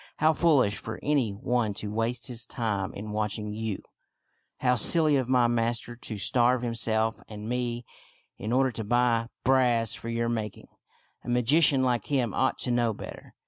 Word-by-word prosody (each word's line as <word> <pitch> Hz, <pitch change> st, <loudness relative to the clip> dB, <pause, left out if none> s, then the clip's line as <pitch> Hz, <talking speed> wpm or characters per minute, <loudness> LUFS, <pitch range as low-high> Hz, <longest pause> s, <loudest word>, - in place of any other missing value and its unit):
How 155 Hz, +1 st, +4 dB
foolish 140 Hz, -12 st, +3 dB
for 110 Hz, -, -7 dB
any 140 Hz, -6 st, +1 dB
one 110 Hz, +1 st, -1 dB
to 105 Hz, 0 st, -5 dB
waste 115 Hz, +2 st, -1 dB
his 120 Hz, -2 st, -3 dB
time 105 Hz, -5 st, -2 dB
in 105 Hz, +1 st, -6 dB
watching 105 Hz, 0 st, -2 dB
you! 110 Hz, -2 st, -4 dB, 0.8 s
How 125 Hz, -1 st, +3 dB
silly 155 Hz, +3 st, +4 dB
of 130 Hz, -2 st, 0 dB
my 125 Hz, -2 st, +4 dB
master 120 Hz, 0 st, -1 dB
to 115 Hz, -2 st, -6 dB
starve 125 Hz, +4 st, +2 dB
himself 115 Hz, -1 st, 0 dB
and 105 Hz, 0 st, -8 dB
me, 120 Hz, 0 st, -2 dB, 0.5 s
in 110 Hz, -, -4 dB
order 130 Hz, +1 st, +2 dB
to 115 Hz, -, -4 dB
buy 120 Hz, +1 st, +2 dB, 0.2 s
brass 120 Hz, -4 st, +3 dB
for 115 Hz, -, -6 dB
your 115 Hz, 0 st, -1 dB
mak 110 Hz, -3 st, -3 dB
ing! -, -, -16 dB, 0.5 s
A -, -, -7 dB
magician 130 Hz, +3 st, +4 dB
like 120 Hz, -4 st, 0 dB
him 125 Hz, -7 st, 0 dB
ought 130 Hz, -, +1 dB
to 125 Hz, -, 0 dB
know 120 Hz, -2 st, +1 dB
better. -, -, -10 dB
120 Hz, 175 wpm, -27 LUFS, 110-125 Hz, 0.8 s, How